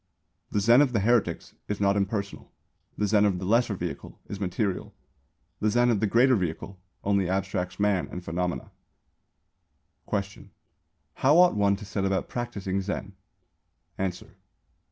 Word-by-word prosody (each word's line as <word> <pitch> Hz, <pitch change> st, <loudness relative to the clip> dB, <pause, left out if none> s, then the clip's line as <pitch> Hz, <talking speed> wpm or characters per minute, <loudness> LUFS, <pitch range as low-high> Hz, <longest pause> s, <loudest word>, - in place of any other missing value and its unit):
_ -, -, -50 dB, 0.5 s
The 105 Hz, -, +1 dB
Zen 115 Hz, +6 st, +6 dB
of 135 Hz, -4 st, +2 dB
the 110 Hz, -, +2 dB
heretics 120 Hz, +2 st, +1 dB
is 105 Hz, -, -3 dB
not 100 Hz, 0 st, +3 dB
impersonal. 100 Hz, 0 st, -3 dB, 0.5 s
The 105 Hz, -, +1 dB
Zen 105 Hz, 0 st, +3 dB
of 100 Hz, -3 st, +2 dB
the 90 Hz, -, -5 dB
Lesser 115 Hz, +1 st, +2 dB
Vehicle 90 Hz, -2 st, -6 dB
is 100 Hz, -, -6 dB
material. 95 Hz, 0 st, -2 dB, 0.6 s
The 110 Hz, -, +2 dB
Zen 120 Hz, +3 st, +3 dB
of 110 Hz, -, +1 dB
the 110 Hz, -, +1 dB
Greater 125 Hz, +5 st, +4 dB
Vehicle 95 Hz, 0 st, -4 dB, 0.2 s
only 100 Hz, -2 st, +1 dB
abstracts 95 Hz, -1 st, -2 dB
man 100 Hz, -3 st, +1 dB
and 90 Hz, 0 st, -7 dB
phenomena. 90 Hz, +1 st, -3 dB, 1.4 s
Question. 100 Hz, -1 st, -4 dB, 0.6 s
How 145 Hz, +5 st, +3 dB
ought 180 Hz, 0 st, +6 dB
one 100 Hz, -1 st, +3 dB
to 105 Hz, +1 st, -9 dB
set 100 Hz, 0 st, -3 dB
about 95 Hz, -1 st, 0 dB
practising 100 Hz, -6 st, -3 dB
Zen? 100 Hz, +1 st, -4 dB, 0.9 s
_Answer. 95 Hz, -2 st, -3 dB
100 Hz, 155 wpm, -27 LUFS, 95-110 Hz, 1.4 s, Zen